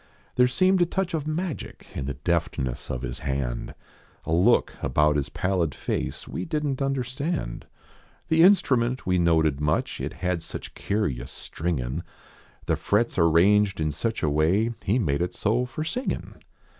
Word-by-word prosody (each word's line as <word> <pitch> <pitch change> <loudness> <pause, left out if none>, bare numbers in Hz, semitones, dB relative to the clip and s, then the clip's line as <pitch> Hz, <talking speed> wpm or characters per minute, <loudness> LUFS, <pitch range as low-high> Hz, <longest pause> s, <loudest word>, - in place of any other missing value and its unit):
There 125 0 +5
seemed 185 +8 +3
a 175 - +4
touch 190 0 -2
of 155 -2 -2
magic 165 0 -4
in 70 - -4
The 70 -1 -3
deftness 70 -4 -2
of 65 0 -3
his - - -4
hand; 65 -3 -3 0.5
A 80 - -1
look 85 +3 +4
about 75 +3 +3
his 70 -2 0
pallid 90 -6 0
face - - -3
We - - -4
didn 150 -4 -1
t 135 - -3
understand. 135 - -2 0.6
The 160 0 +4
instrument 130 -10 +4
we 90 -1 +2
noted 80 -4 +3
much, 75 +1 0
It - - -3
had 90 -2 -2
such - - -7
curioiis 70 - -2
stringing 75 -1 -3 0.6
The - - +1
frets 105 0 +1
arranged 95 +4 +4
in 75 -1 0
such 110 +9 -2
a 75 - +3
way; 90 +10 +2
He 100 - +1
d - - +4
made 75 - 0
it 90 - -2
so 115 +4 +1
for 155 +5 -4
singin. 245 +11 -3
95 Hz, 165 wpm, -26 LUFS, -, 0.6 s, There